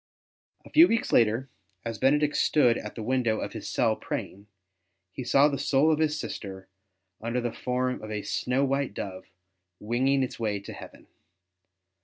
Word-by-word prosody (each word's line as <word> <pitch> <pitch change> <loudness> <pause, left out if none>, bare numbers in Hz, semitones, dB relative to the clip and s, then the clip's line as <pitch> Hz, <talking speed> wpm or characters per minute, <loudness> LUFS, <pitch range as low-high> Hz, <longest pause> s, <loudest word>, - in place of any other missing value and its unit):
A - - -14
few 330 +3 +8
weeks 230 - 0
later, 115 +3 +3 0.4
as 115 -2 -4
Benedict 150 +3 +3
stood 125 -6 +4
at - - -8
the 115 - -5
window 120 -2 +1
of - - -5
his - - -6
cell - - +2
praying, 100 +2 -6 0.7
he 130 - -5
saw 135 +4 +5
the 140 -3 -2
soul 140 +2 +3
of 155 - +1
his 155 -1 +1
sister, 95 -6 -7 0.5
under 115 +2 -1
the 120 -1 -3
form 125 -1 -2
of 110 - -8
a 105 -1 -3
snow 130 +3 0
white 135 -4 -1
dove, 95 -2 -6 0.5
winging 130 +5 +1
its 125 - -5
way 105 -3 -1
to 100 - -9
heaven. - - -12
125 Hz, 170 wpm, -27 LUFS, 110-140 Hz, 0.7 s, few